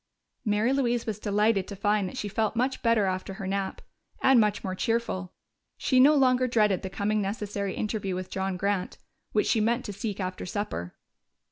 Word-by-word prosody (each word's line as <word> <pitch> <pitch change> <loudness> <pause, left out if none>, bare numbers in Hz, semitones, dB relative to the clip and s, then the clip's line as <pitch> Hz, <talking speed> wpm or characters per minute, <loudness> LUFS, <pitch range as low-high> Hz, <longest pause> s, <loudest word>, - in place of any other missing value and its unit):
Mary 215 +3 +2
Louise 240 -3 +1
was 215 -2 -3
delighted 210 -1 +1
to 200 - -6
find 205 -1 +1
that - - -9
she 210 - -2
felt 220 +2 -1
much 255 +3 0
better 230 -3 +3
after 190 +1 -3
her 195 - -6
nap. 195 0 -3 0.4
And 265 -2 +5
much 210 -2 +1
more 185 - -2
cheerful. 190 -3 -1 0.5
She 255 - +2
no 290 +4 +7
longer 255 -2 +4
dreaded 210 -6 +2
the 190 - -5
coming 205 +2 0
necessary 200 -1 -3
interview 205 -3 -2
with 185 0 -5
John 190 -1 -2
Grant, 200 -1 -1 0.3
which 210 - +2
she 220 - +2
meant 235 +3 +1
to 205 - -5
seek 205 0 -4
after 185 -1 -3
supper. 190 - -4
210 Hz, 190 wpm, -27 LUFS, 195-230 Hz, 0.5 s, no